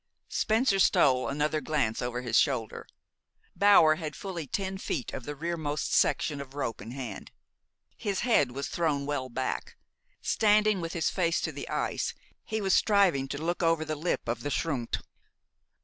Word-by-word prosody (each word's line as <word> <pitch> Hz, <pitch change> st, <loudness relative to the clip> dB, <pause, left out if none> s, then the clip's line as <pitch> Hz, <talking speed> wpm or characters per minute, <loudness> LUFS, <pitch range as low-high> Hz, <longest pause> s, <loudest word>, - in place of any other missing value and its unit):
Spencer 220 Hz, -2 st, +2 dB
stole 130 Hz, -8 st, +4 dB
another 150 Hz, +2 st, 0 dB
glance 140 Hz, -9 st, 0 dB
over 125 Hz, 0 st, -3 dB
his 120 Hz, -, -2 dB
shoulder. 130 Hz, -7 st, -1 dB, 0.7 s
Bower 175 Hz, -5 st, +6 dB
had 155 Hz, -2 st, -5 dB
fully 175 Hz, -7 st, -5 dB
ten 190 Hz, +4 st, -3 dB
feet 135 Hz, -9 st, -3 dB
of 120 Hz, -, -6 dB
the 145 Hz, -, -5 dB
rearmost 155 Hz, -1 st, -2 dB
section 145 Hz, -2 st, +2 dB
of 140 Hz, 0 st, -11 dB
rope 135 Hz, -5 st, -3 dB
in 105 Hz, -, -8 dB
hand. 125 Hz, -5 st, -7 dB, 0.7 s
His 200 Hz, -2 st, -2 dB
head 145 Hz, -, +3 dB
was 140 Hz, +2 st, -4 dB
thrown 150 Hz, -5 st, 0 dB
well 140 Hz, -3 st, -2 dB
back. 130 Hz, +2 st, -3 dB, 0.4 s
Standing 210 Hz, -2 st, +3 dB
with 165 Hz, 0 st, -4 dB
his 170 Hz, -, 0 dB
face 170 Hz, -3 st, +1 dB
to -, -, -2 dB
the -, -, -7 dB
ice, -, -, -2 dB, 0.3 s
he 220 Hz, -1 st, -3 dB
was 195 Hz, -1 st, +1 dB
striving 190 Hz, -10 st, +3 dB
to 140 Hz, -, -4 dB
look 170 Hz, +4 st, -2 dB
over 165 Hz, -2 st, +2 dB
the 155 Hz, -, -2 dB
lip 160 Hz, +4 st, -2 dB
of 120 Hz, 0 st, -2 dB
the 145 Hz, -, -3 dB
schrund. 140 Hz, -6 st, -2 dB
155 Hz, 165 wpm, -29 LUFS, 135-180 Hz, 0.7 s, Bower